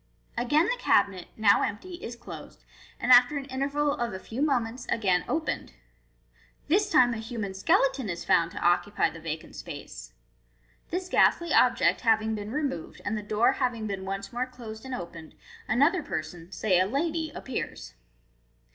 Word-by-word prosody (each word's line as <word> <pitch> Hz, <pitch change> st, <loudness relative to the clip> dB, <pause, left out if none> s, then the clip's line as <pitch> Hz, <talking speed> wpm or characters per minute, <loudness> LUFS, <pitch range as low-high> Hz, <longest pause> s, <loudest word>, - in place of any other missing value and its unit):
Again 295 Hz, +7 st, +3 dB
the -, -, -1 dB
cabinet, 190 Hz, -, +2 dB
now 210 Hz, -2 st, +5 dB
empty, 355 Hz, -, -3 dB
is 235 Hz, -, -6 dB
closed, 235 Hz, -, -11 dB, 0.4 s
and 250 Hz, -, +1 dB
after 250 Hz, +3 st, +7 dB
an 275 Hz, -, -4 dB
interval 285 Hz, +2 st, 0 dB
of 235 Hz, -3 st, -3 dB
a 190 Hz, -, -5 dB
few 225 Hz, +7 st, -6 dB
mo 285 Hz, -4 st, +3 dB
ments, 235 Hz, +2 st, -7 dB
again 190 Hz, -5 st, +2 dB
opened. 315 Hz, 0 st, -2 dB, 0.9 s
This 400 Hz, +6 st, +2 dB
time 245 Hz, -10 st, +5 dB
a -, -, -4 dB
human 220 Hz, -3 st, -4 dB
skele 225 Hz, +7 st, +3 dB
ton 260 Hz, -6 st, -5 dB
is 170 Hz, -1 st, -4 dB
found 165 Hz, 0 st, +3 dB
to -, -, -5 dB
occupy 175 Hz, +4 st, +2 dB
the 165 Hz, -, -10 dB
vacant 160 Hz, -1 st, -6 dB
spat -, -, -7 dB
e. -, -, -10 dB, 1.0 s
This 360 Hz, +2 st, -3 dB
ghastly 340 Hz, -2 st, +3 dB
object -, -, +4 dB
having 220 Hz, -1 st, +2 dB
been 210 Hz, -1 st, -5 dB
removed, 275 Hz, -, -3 dB
and 210 Hz, -, -1 dB
the 210 Hz, -, -3 dB
door 215 Hz, +4 st, +2 dB
having 240 Hz, -4 st, -1 dB
been 195 Hz, -2 st, -4 dB
once 195 Hz, +1 st, -5 dB
more 250 Hz, +2 st, -1 dB
closed 230 Hz, -2 st, -10 dB
and 260 Hz, -1 st, -4 dB
opened, 165 Hz, -2 st, -9 dB, 0.3 s
another 290 Hz, -, +3 dB
person, 165 Hz, -, -6 dB
say 190 Hz, -3 st, +2 dB
a 185 Hz, -, +3 dB
lady, 315 Hz, +6 st, -1 dB
appears. 265 Hz, -, -5 dB
235 Hz, 175 wpm, -27 LUFS, 195-275 Hz, 1.0 s, after